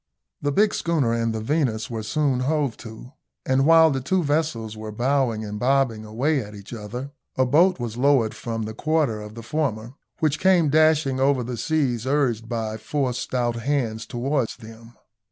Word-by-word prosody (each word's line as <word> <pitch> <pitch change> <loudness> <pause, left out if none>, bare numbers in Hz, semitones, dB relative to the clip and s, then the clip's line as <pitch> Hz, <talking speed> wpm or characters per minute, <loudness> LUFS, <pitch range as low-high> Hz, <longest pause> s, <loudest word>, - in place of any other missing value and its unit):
The 145 - 0
big 205 +7 +3
schooner 150 -9 0
and 115 -1 0
the 110 - -3
Venus 125 -3 0
were 115 -4 -4
soon 135 +3 0
hove 140 -2 0
to, 115 +2 -11 0.3
and 135 +2 +2
while 165 -1 +7
the 135 -1 -1
two 180 +7 0
vessels 145 -8 -1
were 110 0 -7
bowing 120 -1 0
and 105 0 -5
bobbing 125 -3 +1
away 135 +8 0
at 105 -1 -9
each 100 +3 -11
other, 120 +5 -6 0.3
a 130 - +3
boat 170 +7 +4
was 120 -1 -4
lowered 130 -4 +3
from 115 +1 -4
the 110 +1 -5
quarter 150 -5 0
of 105 +1 -10
the 115 - -8
former, 120 -4 -2 0.3
which 155 -3 +1
came 180 -5 +4
dashing 155 -3 +3
over 135 -1 +2
the 125 +1 -4
seas 125 -2 -1
urged 125 -5 0
by 110 -2 -3
four 130 +3 -1
stout 120 -1 -2
hands 115 -3 -2
towards 130 0 -1
them. 115 +1 -13
125 Hz, 180 wpm, -23 LUFS, 115-145 Hz, 0.3 s, while